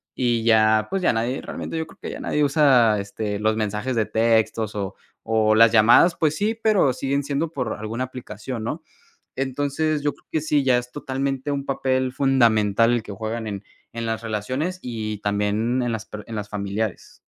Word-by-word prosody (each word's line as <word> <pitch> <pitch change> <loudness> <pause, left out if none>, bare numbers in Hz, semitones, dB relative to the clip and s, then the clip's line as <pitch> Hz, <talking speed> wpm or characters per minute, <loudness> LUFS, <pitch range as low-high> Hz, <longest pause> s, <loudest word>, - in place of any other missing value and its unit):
y 120 -3 +1
ya, 110 -1 +4
pues, 195 0 -1
ya - - +3
nadie 120 +3 -1
realmente, - - -6
yo 160 0 -2
creo - - -17
que - - -6
ya - - -7
nadie 150 - 0
usa, 135 -7 +4
este, 105 +1 -4
los 110 0 +1
mensajes 110 +4 -2
de 110 -2 +2
textos 110 -1 +1
o 100 -1 -3 0.3
o 110 -1 +3
las 115 0 +7
llamadas, 115 +10 +6
pues 155 -1 +1
sí, 215 +2 0
pero 215 - +2
siguen 140 +2 -1
siendo 145 +3 -1
por 125 -8 -3
alguna 115 +4 -3
aplicación, 120 -2 -6
¿no? 155 +7 -4 0.5
Entonces, 145 +3 -1
yo 145 - +1
creo - - -25
que 155 - 0
sí, 150 -2 +1
ya 130 -2 +4
es 125 0 -5
totalmente 135 0 -3
un 140 -1 -2
papel 130 -1 0
fundamental, 115 -5 +3
el 120 - +1
que - - -9
juegan 110 +2 -4
en 100 -1 -5 0.3
en 115 0 -4
las 110 -1 -2
relaciones, 130 - -3
y 110 -3 -4
también 105 +4 0
en 120 - -1
las 110 -1 -4
per 105 0 -8
en 115 - -6
las 105 -1 -5
familiares. 100 0 -4
115 Hz, 195 wpm, -23 LUFS, 110-135 Hz, 0.5 s, las